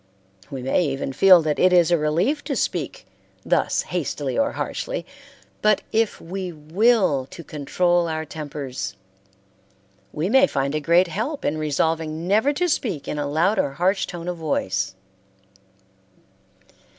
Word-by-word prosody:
We 135 -3 -6
may 135 +7 +2
even 135 -1 -3
feel 185 +2 +7
that 150 -1 -1
it 185 - +5
is 175 -1 +4
a 170 - +5
relief 175 - 0
to - - -2
speak - - -2 0.4
thus - - +1
hastily - - -3
or - - +1
harshly, - - -4 0.6
but 215 -1 +3
if 225 -1 +1
we 185 +1 -5
will 165 - +2
to 170 - -10
control 175 +3 0
our 160 -1 -3
tempers 140 -10 -6 1.2
we 155 +4 -2
may 265 +6 +5
find 140 - -1
a 155 - 0
great 170 +4 +3
help 225 - -3
in 155 +1 0
resolving 160 +2 -1
never 220 +9 +3
to 355 +5 0
speak 210 - -2
in 150 - -3
a 145 - -1
loud 170 +8 +2
or 140 - 0
harsh 185 +7 +1
tone 175 -1 -7
of 180 -1 -3
voice. 95 - -1
165 Hz, 150 wpm, -23 LUFS, 150-195 Hz, 1.2 s, feel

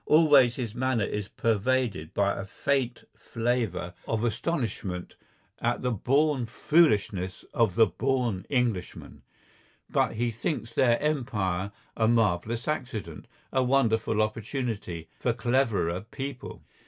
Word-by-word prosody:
Always 145 -6 +6
his 120 -5 -4
manner 125 -2 0
is 105 -1 -3
pervaded 115 -7 0
by 100 0 +2
a - - -4
faint 125 +4 -1
flavour 115 -5 -2
of 115 0 -1
astonishment 115 - -2 0.5
at 120 +1 -1
the 125 - +1
born 135 +3 +1
foolishness 105 - +2
of 115 -6 +2
the 115 0 +7
born 115 0 -1
Englishmen. 120 -9 -2 0.7
But - - +2
he 120 +2 -1
thinks 115 0 -3
their 120 -1 +3
Empire 105 -11 -1 0.2
a 110 - +2
marvellous 115 0 +1
accident, 115 - -4 0.3
a 130 - +3
wonderful 115 -4 +2
opportunity—for 110 - -3
cleverer 115 -7 +1
people. 135 0 -6
115 Hz, 115 wpm, -28 LUFS, 105-130 Hz, 0.7 s, the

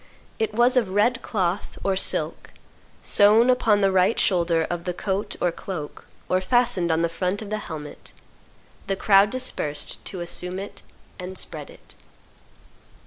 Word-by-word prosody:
It 220 -1 -1
was 245 +3 +4
of 225 -6 +2
red 235 +6 +2
cloth 190 -2 -2
or 195 -1 +1
silk, 190 - -2 0.5
sewn 220 +5 +5
upon 225 -5 +3
the 195 -1 +3
right 185 +4 +3
shoulder 170 -3 +2
of 175 -1 -4
the 180 -1 -3
coat 200 +2 -2
or 175 - +1
cloak, 165 -4 -7 0.2
or 185 0 +1
fastened 185 -5 +2
on 160 +1 +1
the - - +3
front 180 +4 -2
of 210 - -9
the 215 - -1
helmet. 150 -6 -8 0.8
The 195 - 0
crowd 195 +1 +5
dispersed 250 - -4
to 185 - -6
assume 180 +1 -4
it 200 +2 -8 0.4
and 185 +1 -5
spread - - -1
it. - - -17
190 Hz, 155 wpm, -24 LUFS, 175-215 Hz, 0.8 s, sewn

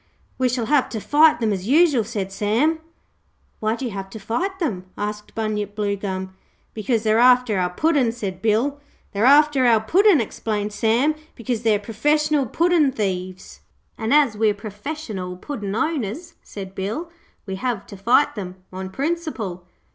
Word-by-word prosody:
'We 255 -1 +2
shall 245 -2 -1
have 290 +1 +2
to 220 - -4
fight 300 +6 +4
them, 220 -3 +1
as 190 0 -4
usual,' 290 -3 +4
said 205 -3 -4
Sam. 230 +11 +1 0.8
'Why 220 +1 0
do 260 - -5
you 240 - -3
have 195 -1 -6
to 220 - -9
fight 350 - -2
them?' 220 - -2
asked 210 0 -5
Bunyip 210 -2 -2
Bluegum. 195 -2 -3 0.4
'Because 220 +1 -1
they're 220 0 +3
after 250 -4 +5
our 180 -1 +1
Puddin',' 275 - +2
said 195 -6 -5
Bill. 230 +7 +1 0.3
'They're 210 +2 0
after 285 -2 +5
our 230 -2 +5
Puddin',' 360 - +4
explained 210 -2 -3
Sam, 235 +8 +2 0.2
'because 235 -1 -3
they're 220 -3 +3
professional 295 +7 +1
puddin' 330 +1 +3
thieves.' 185 -4 -4 0.4
'And 220 0 -3
as 285 -7 +4
we're 210 -1 +2
perfessional 205 - -6
Puddin' 205 -6 -5
owners,' 315 - -2
said 190 -2 -9
Bill, 220 - -4 0.3
'we 190 -2 -5
have 235 -2 -2
to - - -11
fight 235 +9 +3
them 185 -4 -6 0.2
on 190 0 -5
principle. 260 - -3
225 Hz, 160 wpm, -22 LUFS, 200-285 Hz, 0.8 s, after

